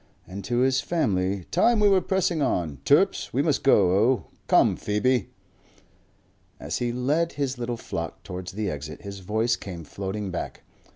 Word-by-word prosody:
And 95 +2 -8
to 120 0 +1
his 130 +1 +3
family, 100 - 0
"Time 235 -2 +3
we 210 - +5
were 195 -2 +4
pressing 180 -4 0
on. 85 - -1
Turps, - - +3
we - - +1
must - - +1
go 90 - +5 0.2
o. 130 - 0 0.2
Come, - - +4
Phoebe!" 105 +2 0 1.3
As - - -3
he 120 -1 -1
led 145 +8 0
his 135 -3 -2
little 120 0 -3
flock 85 -6 -6
towards 90 -1 -7
the 105 +1 -2
exit 75 0 -6
his 100 -1 -7
voice 110 +5 0
came 90 -4 -8
floating 95 +4 -5
back. 90 - -5
110 Hz, 165 wpm, -25 LUFS, 95-130 Hz, 1.3 s, we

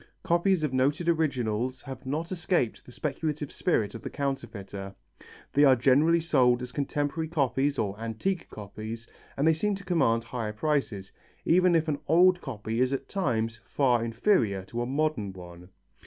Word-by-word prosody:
Copies 180 -1 +2
of 145 -4 -1
noted 140 +6 +1
originals 130 -6 0
have 130 -1 -8
not 160 +6 -3
escaped 175 - 0
the - - -11
speculative 150 +1 -3
spirit 110 - 0
of 115 - -8
the - - -5
counterfeiter. 100 -8 -5 0.6
They 145 - +5
are 135 -2 +7
generally 140 +7 +4
sold 125 -6 +3
as 125 - -6
contemporary 145 +3 -2
copies 140 -2 0
or 100 -1 -2
antique 115 - -3
copies, 110 +2 -7 0.3
and 140 +3 +2
they 160 - +6
seem 205 +6 0
to 195 0 -10
command 115 -11 +2
higher 115 -2 -4
prices, 110 -6 -1 0.3
even 180 +1 +4
if 160 0 +2
an 145 -2 -1
old 180 +3 +5
copy 115 -3 -3
is 130 +1 +2
at 135 0 -3
times 115 - -1
far 125 -5 +1
inferior 115 - +1
to 120 +5 -4
a 120 - -2
modern 135 -8 -1
one. 90 -1 -12
135 Hz, 165 wpm, -28 LUFS, 115-160 Hz, 0.6 s, are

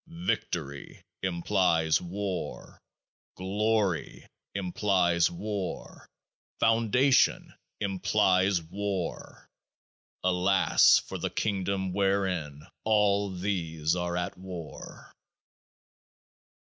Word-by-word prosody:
Victory 70 - -3 0.2
implies 85 -3 +1
war. 95 +1 -5 0.5
Glory 100 -1 -1 0.3
implies 90 -3 +2
war. 100 0 -5 0.5
Foundation 115 +4 +3 0.3
implies 95 -2 +2
war. 95 +1 -5 0.8
Alas! 95 +1 +4
for - - -5
the - - -2
Kingdom 95 -2 -1
wherein 95 -7 -1 0.2
all 100 -2 +2
these 85 -4 -1
are 90 0 -2
at 90 - -3
war. 90 -4 -9
95 Hz, 70 wpm, -28 LUFS, 85-100 Hz, 0.8 s, Alas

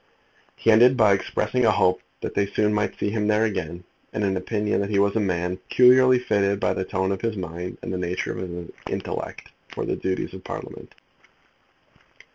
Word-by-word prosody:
He 115 - +2
ended 125 +4 +6
by 105 -4 +5
expressing 105 +5 -1
a - - +5
hope 90 0 +2 0.2
that - - -4
they 100 - +1
soon 105 +1 +1
might 105 0 -1
see 100 - -1
him 105 -1 -1
there 105 +1 +3
again, 90 -4 -4 0.3
and 105 - -2
an 95 -1 +1
opinion 105 +2 -1
that 100 - -3
he 105 - 0
was 100 +1 +2
a - - +2
man 90 -2 -1
peculiarly 125 +4 +5
fitted 100 -4 +1
by - - +1
the 95 - -2
tone 95 +1 -1
of 95 - -3
his 115 -2 -2
mind, 90 0 -6
and - - -4
the 90 - -2
nature 90 0 -2
of - - -6
his 90 -2 -6 0.2
intellect, - - -5 0.2
for - - -5
the - - -1
duties 95 0 -3
of 95 - -9
Parliament. - - -8
100 Hz, 200 wpm, -24 LUFS, 95-110 Hz, 0.3 s, ended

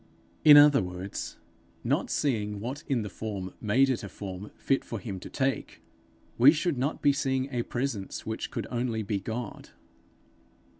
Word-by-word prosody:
In 150 -1 +10
other 145 -1 +7
words, 90 +2 -6 0.5
not - - 0
seeing 105 -7 -1
what 130 +7 -5
in 130 -6 0
the - - -4
form 95 -2 -5
made 120 +6 +3
it 130 -3 -1
a 100 - -6
form 95 +1 -7
fit 135 - +1
for 115 - -5
him 100 -1 -6
to - - -9
take, 135 -3 -2 0.6
we 130 +4 +9
should 155 -3 -1
not 140 +5 -2
be 145 - +5
seeing 135 -2 0
a 120 -2 0
presence 120 -5 -3
which 110 0 -4
could - - -4
only 120 -2 -1
be 100 0 -1
God. 110 +2 -6
120 Hz, 165 wpm, -28 LUFS, 105-135 Hz, 0.6 s, In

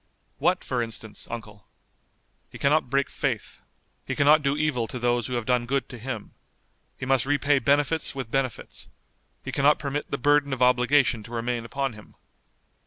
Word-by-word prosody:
"What 180 +5 +2
for 125 -2 -1
instance, 110 -2 -6
Uncle?" 110 -4 -8 0.8
"He - - -10
cannot 145 -1 +2
break 140 0 +1
faith. - - -3 0.4
He - - -4
cannot 150 +2 +5
do 140 0 0
evil 150 -7 0
to 125 - -6
those 120 -1 0
who 125 - -5
have 120 -2 -2
done 125 -1 +1
good 135 +1 0
to 125 - -9
him. 115 -3 -6 0.6
He - - -5
must 135 -1 +2
repay 145 0 +3
benefits 145 +4 +1
with 130 -4 -5
benefits. 130 -3 -3 0.6
He - - -4
cannot 145 +2 +4
permit 145 0 -4
the 140 - -2
burden 145 +1 +3
of 130 - -4
obligation 125 0 +3
to 115 - -12
remain 120 0 -2
upon 135 +1 -2
him. 105 -1 -15
130 Hz, 175 wpm, -26 LUFS, 120-140 Hz, 0.8 s, cannot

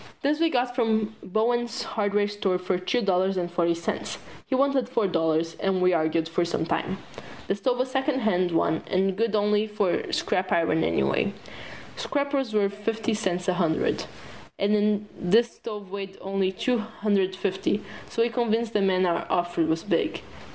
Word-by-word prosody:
This 295 +2 +2
we 330 0 +3
got 245 -3 0
from 220 -3 +1
Bowen's 235 +4 0
hardware 205 -1 0
store 205 -3 0
for 180 0 -1
two 235 +6 0
dollars 190 0 +2
and 175 -1 -2
forty 170 -1 +2
cents. 170 0 -3 0.3
He 265 - 0
wanted 270 -2 +2
four 235 -4 +1
dollars, 165 -2 +1
and 195 -2 +1
we 180 0 +4
argued 160 0 +1
for 165 +2 0
some 170 -1 -1
time. 190 +3 -1 0.5
The - - +1
stove 245 +5 0
was 255 +1 0
a - - -12
secondhand 255 -10 +1
one 165 -1 +1
and 190 0 +1
good 220 +1 +1
only 210 +1 +2
for 210 -4 -1
scrap 185 0 0
iron 160 -1 +2
anyway. - - +1 0.6
Scrap 285 -1 -1
was 270 -4 0
worth 200 -2 +1
fifty 225 +2 -2
cents 185 -4 -1
a 185 - +3
hundred, 170 -3 0 0.5
and 210 0 +2
this 225 +7 +3
stove 210 -4 -7
weighed 195 -1 -6
only 195 -1 0
two 245 +5 0
hundred 205 -3 0
fifty, 195 +1 -1 0.3
so 230 - +1
we 235 - +1
convinced 230 -1 0
the 210 - +2
man 185 -1 +3
our 170 -1 0
offer 175 -1 0
was 160 +1 0
big. - - 0
200 Hz, 175 wpm, -26 LUFS, 180-225 Hz, 0.6 s, we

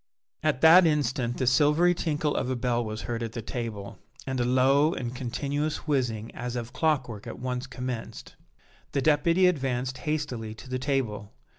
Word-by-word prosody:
At 155 -4 0
that 165 +2 +8
instant 130 -5 0
the 130 - 0
silvery 150 +7 +4
tinkle 155 -4 -1
of 130 - -1
a 130 - 0
bell 120 0 0
was 110 0 -5
heard 120 -1 -3
at 115 -1 -4
the 115 - -4
table, 115 -4 -5 0.3
and 130 -1 -2
a - - +2
low 135 +5 +3
and 120 -2 -4
continuous 140 +4 -3
whizzing 120 -6 -1
as 125 0 -5
of 120 0 -5
clockwork 130 -10 -1
at - - -6
once 125 +1 -3
commenced. 125 -3 -6 0.6
The 140 - 0
Deputy 165 +4 +4
advanced 130 -6 0
hastily 130 -8 -3
to 120 - -12
the 130 0 -3
table. 120 -7 -2
130 Hz, 170 wpm, -27 LUFS, 120-150 Hz, 0.6 s, that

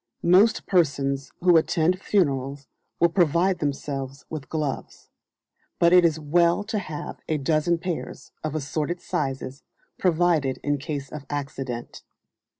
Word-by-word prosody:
Most 190 +6 +4
persons 140 -6 +1
who 175 -1 +6
attend 170 +3 +1
funerals 140 -8 0 0.3
will 170 - +5
provide 175 +2 +2
themselves 140 -1 -4
with 150 -4 -6
gloves; 150 -4 -4 0.7
but 170 +1 +4
it 180 -1 +7
is 160 -2 +2
well 170 +5 +2
to 215 0 -2
have 155 -6 -6
a 155 - +1
dozen 155 +4 +1
pairs, 170 0 -5
of 155 -1 -3
assorted 155 +3 -2
sizes, 135 -3 -3 0.4
provided 165 -6 +2
in 145 0 0
case 140 -1 -5
of 150 -2 -8
accident. 135 -4 -5
155 Hz, 130 wpm, -25 LUFS, 140-175 Hz, 0.7 s, it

